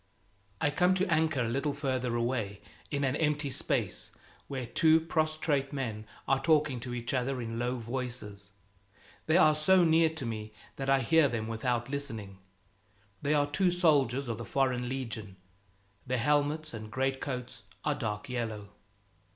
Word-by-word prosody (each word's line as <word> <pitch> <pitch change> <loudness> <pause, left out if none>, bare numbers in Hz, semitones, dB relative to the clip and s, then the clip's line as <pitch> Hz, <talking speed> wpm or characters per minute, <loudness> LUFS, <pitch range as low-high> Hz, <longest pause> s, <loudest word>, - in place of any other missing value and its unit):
I 145 - +2
come 180 +4 +3
to 190 +1 +2
anchor 155 -4 +2
a 120 - 0
little 140 +5 0
farther 130 -4 -1
away, 115 -4 -1 0.3
in 140 -1 -1
an 135 0 +1
empty 150 -2 0
space - - -1 0.4
where 130 -3 -4
two 160 +7 +4
prostrate 155 -4 0
men 110 -6 -4 0.2
are 135 0 +2
talking 150 -4 +3
to 120 +1 -5
each 120 +1 -3
other 130 0 0
in 115 -1 -4
low 125 +1 -1
voices; 115 -4 -4 0.8
they 160 +2 +5
are 155 -4 +6
so 180 +5 +4
near 160 0 +5
to 160 -4 -6
me 110 -2 -5 0.2
that 135 0 -2
I 135 0 +4
hear 160 +5 +5
them 115 -4 -3
without 120 +2 -1
listening. 110 -9 -5 0.8
They 150 +2 +2
are 145 -1 +3
two 160 +6 +2
soldiers 140 -7 +2
of 115 -1 -3
the - - -4
Foreign 125 0 0
Legion; 110 -7 -5 0.7
their 130 +1 0
helmets 150 +4 +1
and 110 -1 -7
greatcoats 130 0 -3 0.2
are 150 - +2
dark 105 -7 -4
yellow. 110 -5 -4
130 Hz, 160 wpm, -30 LUFS, 115-150 Hz, 0.8 s, are